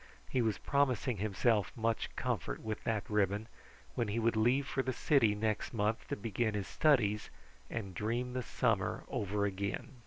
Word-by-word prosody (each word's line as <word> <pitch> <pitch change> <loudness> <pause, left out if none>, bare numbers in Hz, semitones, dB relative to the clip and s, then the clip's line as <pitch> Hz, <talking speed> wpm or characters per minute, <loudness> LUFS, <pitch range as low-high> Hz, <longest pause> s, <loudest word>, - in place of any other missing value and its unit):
He 130 - +2
was 110 -3 +1
promising 130 -4 +1
himself 105 +2 +1
much 115 0 0
comfort - - -2
with 110 -1 -4
that 110 -3 -1
ribbon, 105 +1 +1 0.5
when 120 -3 0
he 105 +2 -2
would 115 0 +2
leave 120 +6 +3
for 135 - -1
the 130 0 -2
city 120 -9 +3
next 110 +2 -1
month 105 +1 0
to - - -2
begin 110 +1 -1
his 100 -2 -2
studies 110 -9 +2 0.4
and 100 -4 -4
dream 120 +6 -2
the 130 - -1
summer - - 0
over 100 0 0
again. 100 +6 -3
110 Hz, 165 wpm, -34 LUFS, 105-120 Hz, 0.5 s, leave